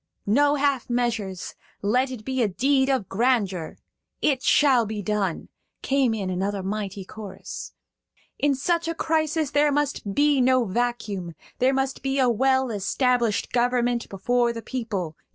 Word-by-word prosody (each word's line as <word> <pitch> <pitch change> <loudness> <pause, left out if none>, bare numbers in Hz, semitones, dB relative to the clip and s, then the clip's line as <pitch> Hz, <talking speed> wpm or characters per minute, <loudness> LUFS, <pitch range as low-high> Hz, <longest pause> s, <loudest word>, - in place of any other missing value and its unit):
"No 285 +7 +3
half 280 -4 0
measures; 225 -6 -2 0.3
let 250 +6 +2
it 245 -5 -8
be 260 -1 -1
a 225 - +3
deed 265 +7 +2
of 260 -8 0
grandeur!" 200 -7 0 0.4
"It 270 -3 +1
shall 260 -5 +4
be 210 -1 -4
done!" 200 -3 -2 0.3
came 265 -4 +2
in 195 -3 -3
another 195 +2 -2
mighty 200 -1 -4
chorus. 200 -2 -8 0.7
"In 285 -1 +2
such 335 +5 0
a 330 - -2
crisis 315 -2 0
there 295 0 +3
must 285 -8 -1
be 290 -2 +3
no 255 -1 +3
vacuum. 210 -5 -2 0.2
There 255 +1 +4
must 270 -1 -1
be 270 0 -1
a 260 -2 +4
well 260 +2 +2
established 230 +2 0
government 245 -1 +1
before 240 +5 +1
the 230 -1 -7
people. 205 -11 -4
245 Hz, 150 wpm, -24 LUFS, 205-270 Hz, 0.7 s, shall